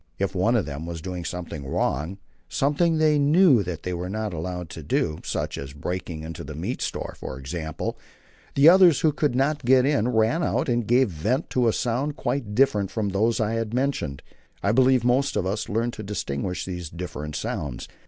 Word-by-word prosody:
If 100 0 -1
one 105 +6 +2
of 110 - +2
them 75 +3 -6
was 85 -1 -5
doing 90 +1 -5
something 85 -4 -5
wrong 75 +6 -1 0.3
something 160 +4 +2
they 155 -1 +4
knew 145 - +5
they 90 0 -4
were 90 +1 -4
not 105 0 -3
allowed 90 +2 -4
to 80 - -7
do, 75 +1 -1
such - - -3
as 70 0 -7
breaking 85 +1 -5
into 80 0 -7
a - - -7
meat - - -4
store, - - -3
for 65 - -6
example 80 +3 -4 0.6
the 140 +2 +6
others, 175 -4 +7
who 155 - +4
could 145 -3 0
not 140 +3 +1
get 130 +1 +5
in, 130 -6 +2
ran 115 +6 +2
out 155 -1 0
and 120 -3 0
gave 125 0 +4
vent 105 - -1
to 125 -2 +2
a - - +4
sound 130 +6 -1
quite 115 -10 -2
different 105 -7 +3
from 110 -3 -2
those 110 +5 +1
I 110 -1 +1
have 115 -1 -2
mentioned. 125 - -1 0.4
I 100 - +3
believe 130 +1 +4
most 130 +3 +2
of - - 0
us 100 +3 -2
learned 115 +3 0
to 115 - -7
distinguish 90 -4 -3
these 90 -3 -5
different 75 -3 -6
sounds. 70 -4 -4
105 Hz, 195 wpm, -25 LUFS, 85-130 Hz, 0.6 s, others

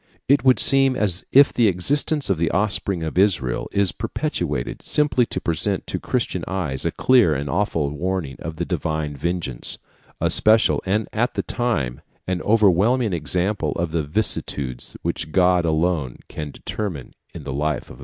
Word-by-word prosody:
It 140 -2 +3
would 130 -1 +4
seem 135 -1 +5
as 100 -6 0
if 140 +1 +6
the 120 -2 +3
existence 140 - +1
of 90 - 0
the 85 - +1
offspring 100 -3 0
of 80 +3 -2
Israel 80 -11 +1
is 100 -2 +3
perpetuated - - -3
simply 140 -5 +1
to - - -3
present 85 -2 -1
to - - -3
Christian - - -2
eyes 85 -9 -2
a - - +1
clear 120 -12 +3
and 70 +1 -3
awful 75 -2 -1
warning 85 -3 -3
of 80 - -6
the 85 +2 -3
Divine 80 -3 -3
vengeance, 80 -3 -3 0.4
a - - +1
special, 110 +1 +4
and 105 +3 0
at 120 +3 0
the - - -2
same - - -4
time 75 - -1 0.2
an 90 -1 -2
overwhelming 110 +2 +3
example 90 0 -1
of 85 -1 -3
the 80 0 0
vicissitudes 70 - -2
which 80 - -3
God 90 0 +3
alone 80 -5 0
can 75 -1 -6
determine 85 -3 -6 0.2
in - - -7
the 65 - -5
life 75 0 -1
of - - -21
a - - -10
people. - - -16
90 Hz, 175 wpm, -22 LUFS, 75-105 Hz, 0.4 s, if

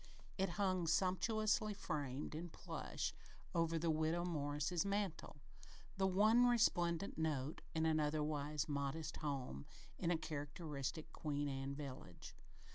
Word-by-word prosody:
It 190 -1 +1
hung 185 -4 +2
sumptuously 210 +5 +2
framed 145 -7 -3
in 165 +3 -4
plush, - - -3 0.4
over 165 -1 +2
the 165 0 +2
Widow 160 +2 +1
Morris's 150 0 0
mantel, 200 -6 -1 0.6
the 190 0 +3
one 215 +6 +6
resplendent 175 -7 +3
note 150 -2 -1
in 160 0 +2
an 160 -1 +3
otherwise 150 -1 0
modest 145 +2 -2
home, 135 - -3 0.3
in 170 - +1
a 175 - +3
characteristic 150 -1 -4
Queen 145 -1 -1
Anne 135 0 -3
village. 130 - -8
160 Hz, 120 wpm, -40 LUFS, 145-180 Hz, 0.6 s, one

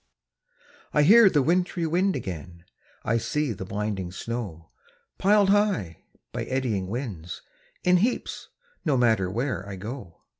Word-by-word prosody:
I 150 - +5
hear 215 +5 +8
the 145 -6 +2
wintry 175 +2 +1
wind 180 +4 +1
again, 90 - -7 0.4
I 115 +1 +2
see 150 +1 -1
the 95 -1 -7
blinding 100 -2 -3
snow, 95 -6 -6 0.5
Pil'd 200 0 +4
high, 195 - +1 0.3
by - - -4
eddying 120 -8 -1
winds, 100 - -5 0.4
in 180 0 +5
heaps, 230 +7 -1 0.4
No 150 -6 +2
matter 110 -6 +3
where 110 -2 -2
I 100 - -5
go. 105 -2 -8
120 Hz, 135 wpm, -26 LUFS, -, 0.5 s, hear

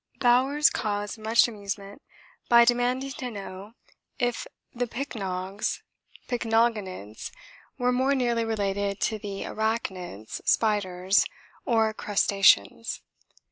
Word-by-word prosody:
Bowers 265 +5 +4
caused 205 0 -3
much 220 +2 +4
amusement 200 +1 -6 0.5
by 235 0 +8
demanding 245 +3 +1
to 255 -1 -5
know 200 -1 -8 0.4
'If 245 -3 -1 0.3
the 245 0 -2
pycnogs 200 -6 -3 0.4
(pycnogonids) 225 - -1 0.5
were 250 -1 +2
more 260 +3 +2
nearly 240 -3 +1
related 200 -2 -1
to 220 -2 0
the 200 -1 -5
arachnids 190 - -3
(spiders) 195 -3 +2 0.4
or 225 -4 +2
crustaceans.' 195 - +2
220 Hz, 100 wpm, -27 LUFS, 195-240 Hz, 0.5 s, by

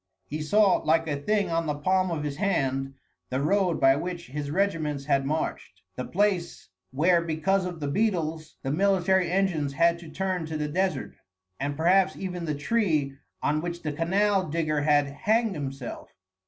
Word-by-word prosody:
He 155 +1 -5
saw, 200 +5 +4
like 165 +1 +1
a 150 - 0
thing 205 +1 +1
on 165 -1 0
the 150 - 0
palm 185 +5 +1
of 160 -3 -2
his 145 -2 -4
hand, 135 -9 0 0.3
the 130 - -1
road 180 +4 +1
by 135 0 +5
which 175 +3 -4
his 145 +1 -4
regiments 155 -5 -1
had 135 -2 +1
marched, 155 +2 -3
the 125 - -3
place 190 -3 -1 0.2
where 170 +6 +3
because 170 +4 0
of 175 -2 -5
the 145 - -3
beetles 160 -4 -1
the 135 - -1
military 190 +1 +2
engines 175 -7 0
had 170 +3 +3
to 170 -2 -11
turn 185 -3 -2
to 160 -1 -3
the 150 0 -2
desert, 175 -2 -1 0.5
and 140 +1 -2
perhaps 180 +4 +3
even 180 -2 -5
the 150 -2 -1
tree 155 -4 0 0.3
on 150 +1 +1
which 175 0 -5
the 150 -2 -2
canal 190 +4 +1
digger 155 -1 0
had 145 -1 +3
hanged 215 +10 0
himself. 135 -4 -6
165 Hz, 175 wpm, -27 LUFS, 145-190 Hz, 0.5 s, by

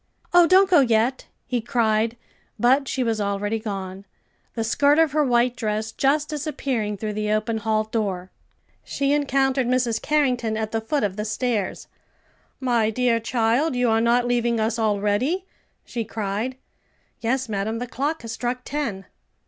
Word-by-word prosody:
"Oh, 350 -1 +7
don't 380 +2 +6
go 360 -5 +5
yet!" 240 0 +2 0.2
he 245 -2 -1
cried, 225 -1 +1 0.4
but 260 +5 +3
she 260 - -1
was 225 -3 -1
already 205 +2 -1
gone, 195 -3 -6 0.5
the 225 - -1
skirt 285 +6 +3
of 325 -3 +4
her 300 +1 +2
white 245 -1 +2
dress 215 -1 -2
just 290 +5 +1
disappearing 265 -8 -2
through 215 +1 -4
the 210 0 -2
open 220 +1 0
hall 215 0 +1
door. 200 -5 -3 0.5
She 280 0 0
encountered 270 -3 +1
Mrs. 245 -3 +1
Carrington 250 -7 +1
at 220 -1 -3
the 225 - -1
foot 260 +4 -1
of 200 -1 -1
the 210 - -2
stairs. 220 -2 -2 0.7
"My 240 -4 +1
dear 235 0 +1
child, 235 +5 +1
you 245 -2 +2
are 225 0 +3
not 240 +1 +3
leaving 240 -1 +1
us 220 +1 0
already?" 215 - 0 0.4
she 235 - -3
cried. 220 +3 -3 0.6
"Yes, 260 +2 -1
madam; 215 +1 -2
the 245 - -3
clock 280 +5 -3
has 230 - -6
struck 245 +2 -3
ten." 250 -10 -3
235 Hz, 160 wpm, -23 LUFS, 215-265 Hz, 0.7 s, Oh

